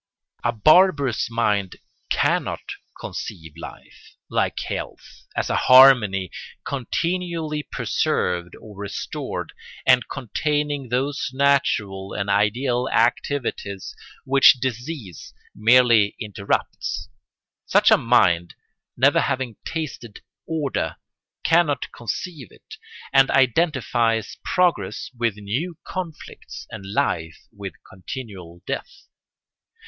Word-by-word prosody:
A 120 - +2
barbarous 145 - +4
mind 105 -5 0 0.3
cannot - - 0 0.3
conceive 80 -2 -7
life, 85 - -12 0.2
like - - 0
health, - - -7
as - - 0
a - - 0
harmony 120 -8 +6 0.3
continually 165 +3 -2
preserved 90 - -1
or 105 -2 -13
restored, 100 0 -5 0.3
and 125 -1 +4
containing 145 +1 -2
those 135 +4 -1
natural 110 -9 +1
and 100 0 -2
ideal 120 +5 +1
activities 115 -6 -1 0.3
which 135 0 +7
disease 125 - -6 0.2
merely 115 -1 +5
interrupts. 100 -2 -3 0.6
Such - - +4
a - - +9
mind, 90 -8 +3 0.4
never - - +4
having 130 -4 -2
tasted 150 -9 -6 0.3
order, 155 -5 -2 0.5
cannot 165 -3 +2
conceive 130 - -5
it, - - -14 0.4
and 135 -1 +6
identifies 125 - +1
progress 165 - 0
with 115 -3 0
new 125 - -4
conflicts 175 -5 -7
and 100 -3 -8
life 80 -5 -1 0.2
with 100 -2 -7
continual 95 -4 -9
death. 320 - -5
120 Hz, 95 wpm, -23 LUFS, 100-140 Hz, 0.6 s, a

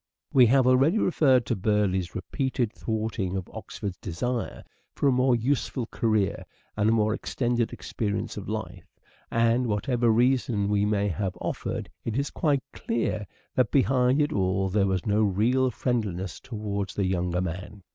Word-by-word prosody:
We 125 -3 +7
have 130 +2 +4
already 135 +9 +4
referred 135 - +3
to - - 0
Burieigh's 95 -3 0
repeated 125 +3 -2
thwarting 110 -4 -2
of 95 - -5
Oxford's 100 -3 -6
desire 115 +7 -3 0.3
for 145 - +1
a - - +5
more 125 0 +3
useful 125 +1 -1
career 110 -4 0 0.3
and 105 +1 +2
a - - +4
more 110 -1 +2
extended 120 0 -1
experience 105 -3 -3
of - - -6
life; - - -5 0.4
and 115 +2 +2
whatever 115 +3 +1
reason 115 -3 +2
he 100 +1 +2
may 105 -1 +1
have 95 +2 -3
offered, - - -3 0.2
it 115 0 -2
is 140 +1 -1
quite 145 -5 +1
clear 115 -3 -2 0.3
that 125 -4 +2
behind 130 0 +3
it 150 +1 +1
all 95 -1 +1
there 100 +1 +2
was 95 -2 -1
no 105 +1 +2
real 115 +6 +2
friendliness 105 -8 -2
towards 100 -5 -4
the 100 - 0
younger 90 -1 0
man. 90 +2 -6
110 Hz, 155 wpm, -26 LUFS, 100-125 Hz, 0.4 s, We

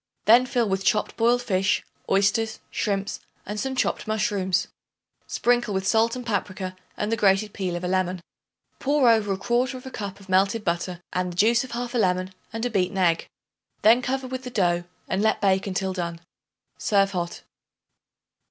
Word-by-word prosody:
Then 240 +4 +6
fill 240 -2 +1
with 195 0 -1
chopped 210 +2 +1
boiled 240 +2 +3
fish, 190 -4 +1 0.3
oysters, 200 +3 +2
shrimps 200 -1 -2 0.3
and 210 +1 -4
some 265 +2 -2
chopped 255 - 0
mushrooms. 205 -4 0 0.6
Sprinkle 240 -4 +1
with 190 0 -1
salt 225 +3 +3
and 250 -1 -6
paprica 190 -4 -3 0.2
and 210 +1 -2
the - - +3
grated 205 -1 +2
peel 185 -3 -2
of 175 - -5
a - - -1
lemon. 185 0 0 0.6
Pour 280 -1 +3
over 205 -4 +2
1/4 250 +5 -1
cup 200 -2 -5
of 195 - -15
melted 195 +4 +2
butter 175 0 -2
and 180 0 -1
the - - -13
juice 230 +5 +4
of 255 -2 -8
1/2 245 0 -2
lemon 185 -2 +1 0.2
and 225 +2 -3
a 245 - -1
beaten 195 -1 0
egg. 170 -3 +2 0.6
Then 230 +4 +6
cover 265 +1 -2
with 255 0 -5
the 250 - -5
dough 175 -6 +1 0.2
and 190 - 0
let 220 0 +2
bake 195 -1 +2
until 190 0 -1
done. 170 -2 -4 0.6
Serve 195 -1 +2
hot. 175 -2 -3
205 Hz, 170 wpm, -25 LUFS, 185-235 Hz, 0.6 s, Then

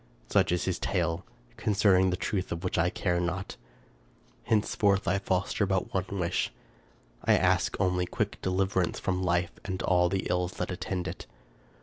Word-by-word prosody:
Such - - +3
is 90 - 0
his 95 -1 -1
tale, 85 -1 -1 0.3
concerning 100 -4 +3
the 90 - -1
truth 95 +2 -2
of 85 +1 -4
which 90 -1 0
I 85 +2 +3
care 90 -3 0
not. 90 +2 -3 0.9
Hence 110 -2 +1
forth 100 -1 +2
I 95 +2 +2
foster 95 +2 0
but 95 -1 -1
one 95 -1 0
wish: 85 0 0 0.7
I - - +5
ask - - +2
only 90 -1 +1
quick - - -2
deliverance 95 -1 0
from 95 -1 -1
life 90 -1 +1
and 95 -2 -4
all 90 -1 +3
the 95 0 -1
ills 90 0 0
that - - -3
attend 90 0 -3
it. 90 - -7
90 Hz, 165 wpm, -29 LUFS, 90-95 Hz, 0.9 s, I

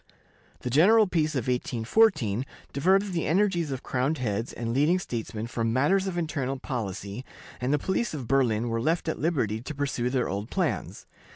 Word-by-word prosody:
The 125 - -3
general 210 - +6
peace 155 -5 0
of 130 - 0
1814 125 - +2 0.3
diverted 190 +8 +3
the 165 - -1
energies 175 -2 +2
of 130 -1 -4
crowned 135 +5 0
heads 115 -2 -2
and 115 -1 -3
leading 150 +7 +3
statesmen 115 -9 -4
from 115 -1 -1
matters 190 +11 +2
of 180 -2 -3
internal 145 -6 -2
policy, 105 -4 -5 0.4
and 125 +2 0
the 150 - +4
police 190 +5 -1
of 130 -6 -6
Berlin 120 -4 +2
were 115 0 -1
left 165 +7 0
at 160 - -2
liberty 130 - 0
to 150 +5 -6
pursue 135 -3 -1
their 125 -1 0
old 100 +4 -4
plans. 150 - -2
135 Hz, 175 wpm, -27 LUFS, 115-165 Hz, 0.4 s, general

